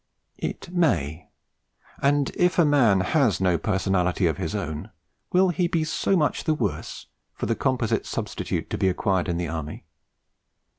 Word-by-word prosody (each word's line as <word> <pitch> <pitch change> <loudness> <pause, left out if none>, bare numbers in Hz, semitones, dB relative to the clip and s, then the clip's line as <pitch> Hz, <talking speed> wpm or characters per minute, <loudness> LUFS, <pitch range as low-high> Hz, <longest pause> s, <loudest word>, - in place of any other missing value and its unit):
It 175 - -5
may: 90 - 0 0.7
and 140 0 +2
if 180 +1 +2
a 170 - +5
man 120 -10 +4
has 110 - +2
no 90 -3 +2
personality 95 -2 +1
of 80 -4 +1
his - - -3
own, 75 0 -4 0.4
will 185 +1 +4
he 175 0 +1
be 165 -2 0
so 185 +4 +1
much 150 -3 0
the 155 -1 +2
worse 110 -10 -3 0.3
for - - -3
the - - +1
composite - - 0
substitute - - -3
to - - -2
be 95 - +3
acquired 95 0 0
in 85 - -1
the 85 0 -2
Army? 80 -2 -6
100 Hz, 160 wpm, -25 LUFS, -, 0.7 s, a